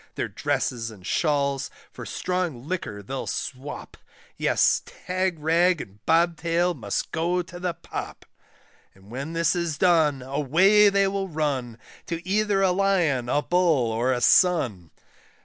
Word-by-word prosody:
Their - - -3
dresses 115 -2 -2
and 100 -5 -13
shawls 140 - 0 0.2
for - - -9
strong 170 -8 -3
liquor 120 - -4
they'll 130 +6 -5
swop, 135 +3 -6 0.4
Yes, - - +2
Tagrag 175 -1 0
and 100 -3 -10
Bobtail 170 +1 +2
must 110 -10 -3
go 175 +2 0
to 175 +1 -11
the 180 -2 -2
pop; - - -7 0.7
And 95 +2 -18
when 140 +6 -5
this 165 +1 +1
is 170 -4 -2
done, 155 -7 +3
away 165 +10 +4
they 200 0 +2
will 195 0 -2
run, 140 -7 -2 0.3
To 170 +1 -5
either 205 0 +1
a 190 - +4
Lion, 180 -10 +1
a 145 - +1
Bull, 165 -10 +2
or 120 +3 0
a 125 -1 -1
Sun. 125 - +3
165 Hz, 140 wpm, -25 LUFS, 130-180 Hz, 0.7 s, away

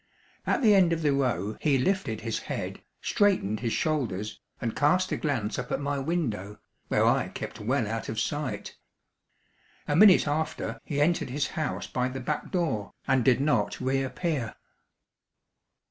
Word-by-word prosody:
At 305 - +1
the 215 -2 +7
end 180 -4 +5
of 165 -1 -2
the 145 -2 +3
row 110 -7 0
he 145 -3 +3
lifted 135 - 0
his 115 0 -2
head, - - -5 0.2
straightened 185 - +2
his 115 -1 -1
shoulders, 110 - -1 0.2
and 115 -2 -3
cast 180 +6 +2
a - - +1
glance 115 -8 -1
up - - -5
at - - 0
my 145 0 -1
window, 120 - -2 0.3
where - - +2
I - - +3
kept - - -7
well 120 +1 0
out 115 +1 -3
of 110 - -2
sight. 145 +3 -3 1.1
A 145 - +1
minute 190 -2 +7
after, 155 +2 -2
he 145 - -2
entered 160 0 +2
his 140 +3 -1
house 155 -5 -3
by 125 0 -1
the 130 +1 -5
back 150 +4 -3
door, 155 - -1
and 130 -2 +3
did 125 0 +4
not 125 -8 +1
reappear. 135 0 -1
135 Hz, 160 wpm, -28 LUFS, 115-155 Hz, 1.1 s, the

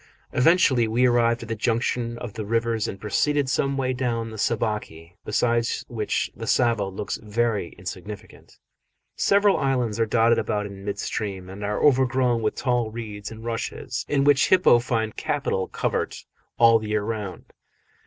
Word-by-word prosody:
Eventually 130 -5 +4
we 120 +3 +2
arrived 120 -1 +2
at - - -9
the 115 - -1
junction 115 +1 -1
of 120 -3 -7
the 110 - -5
rivers 115 0 0
and 95 - -6
proceeded 145 +6 +1
some 135 +1 0
way 130 -1 0
down 120 -3 -2
the 110 - -8
Sabaki, 105 -8 -2
beside 115 +2 +1 0.2
which 110 -3 -2
the - - -7
Tsavo 115 -5 +2
looks 95 +1 -4
very 110 -3 -1
insignificant. 95 +3 -9 0.6
Several 200 0 +3
islands 125 -5 0
are 115 - +2
dotted 115 +1 +3
about 105 -1 -1
in 100 -1 -9
mid 100 0 -3
stream 95 -3 -4
and 100 +2 -8
are 105 +1 -2
overgrown 130 -3 +3
with 110 - -1
tall 120 -3 0
reeds 105 -3 -7
and 110 0 -10
rushes, 115 -1 -4
in 140 -1 +2
which 145 -1 +4
hippo 180 -10 +6
find 115 -3 -2
capital 95 -1 -1
covert - - -3 0.3
all 115 -1 +6
the 110 - -6
year 105 -1 0
round. 105 -5 -5
115 Hz, 165 wpm, -24 LUFS, 105-125 Hz, 0.6 s, hippo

